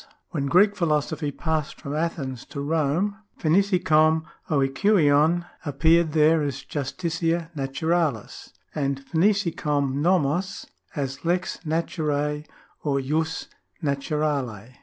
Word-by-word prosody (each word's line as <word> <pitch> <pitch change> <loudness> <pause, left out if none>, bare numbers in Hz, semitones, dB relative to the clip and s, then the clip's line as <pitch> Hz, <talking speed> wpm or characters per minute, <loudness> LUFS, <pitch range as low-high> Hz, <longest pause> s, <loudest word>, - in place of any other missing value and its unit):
When 140 -4 -1
Greek 200 +7 +5
philosophy 155 -3 0
passed 155 +1 -2
from 140 - -6
Athens 140 -6 -3
to 140 - -7
Rome, 160 +7 0 0.3
([iva - - +3
iKov 160 -4 +3 0.3
oiKaiov 155 +2 +3 0.2
appeared 160 +2 +3
there 155 +1 +4
as 140 -2 -3
justitia 165 +3 -2
naturalis 140 -2 -1 0.2
and 140 -2 -2
(pv(TiK09 160 -7 +1
uo/uo? 175 +2 +1 0.3
as 135 -2 -3
lex 175 +2 0
naturae 150 -2 -1 0.4
or 140 -2 +1
jus 155 +4 -1 0.4
7iaturale. 140 -6 -2
155 Hz, 100 wpm, -25 LUFS, 140-170 Hz, 0.4 s, Greek